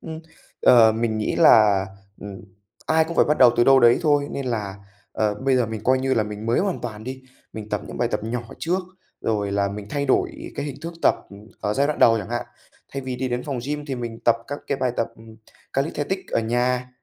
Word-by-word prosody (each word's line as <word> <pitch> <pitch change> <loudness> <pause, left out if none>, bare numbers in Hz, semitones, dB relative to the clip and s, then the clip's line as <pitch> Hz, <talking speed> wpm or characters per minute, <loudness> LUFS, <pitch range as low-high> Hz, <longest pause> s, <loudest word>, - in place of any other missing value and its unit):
Ừm, 160 -1 -7 0.4
ờ, 115 -3 +7
mình 110 -1 -1
nghĩ 105 - -1
là, 105 -3 +5 0.3
ừm, 100 -2 -8 0.5
ai 160 0 +3
cũng 170 +1 -7
phải - - +5
bắt 150 - 0
đầu 125 -2 +8
từ 120 - +4
đâu 135 0 +6
đấy 120 0 +6
thôi 145 -2 +2
nên 140 - -4
là, 105 -5 -3 0.4
ờ, 105 -1 0
bây 130 +4 +1
giờ 120 -3 +2
mình 110 -1 -5
coi 130 +1 +3
như 130 0 0
là 110 - +2
mình 105 +1 -7
mới 115 - +2
hoàn 195 -2 -1
toàn 110 -2 -7
đi. 130 +1 -7 0.3
Mình 110 -1 -8
tập - - -2
những - - -8
bài - - +1
tập - - -2
nhỏ 120 +1 -3 0.2
trước, 175 +3 0 0.4
rồi 105 -2 -1
là 100 0 +1
mình 100 0 -7
thay 140 0 -1
đổi 130 - -1
cái 140 - -4
hình 140 - -6
thức 170 +1 -5
tập - - +5 0.5
ở 105 +1 -1
giai 140 +1 +2
đoạn 150 - -2
đầu 115 -1 +5
chẳng 105 - -6
hạn. 120 0 -3 0.5
Thay 135 - -3
vì 130 -1 -4
đi 130 +1 -2
đến 125 0 -2
phòng 140 -4 -4
gym 150 0 -4
thì 135 - -3
mình 120 -2 -6
tập 115 -1 +4
các 145 +1 -5
cái 140 - -1
bài 125 -2 0
tập 115 - 0 0.6
calisthenics 150 +6 -3
ở - - +2
nhà, 125 +2 0
125 Hz, 235 wpm, -23 LUFS, 110-140 Hz, 0.6 s, đầu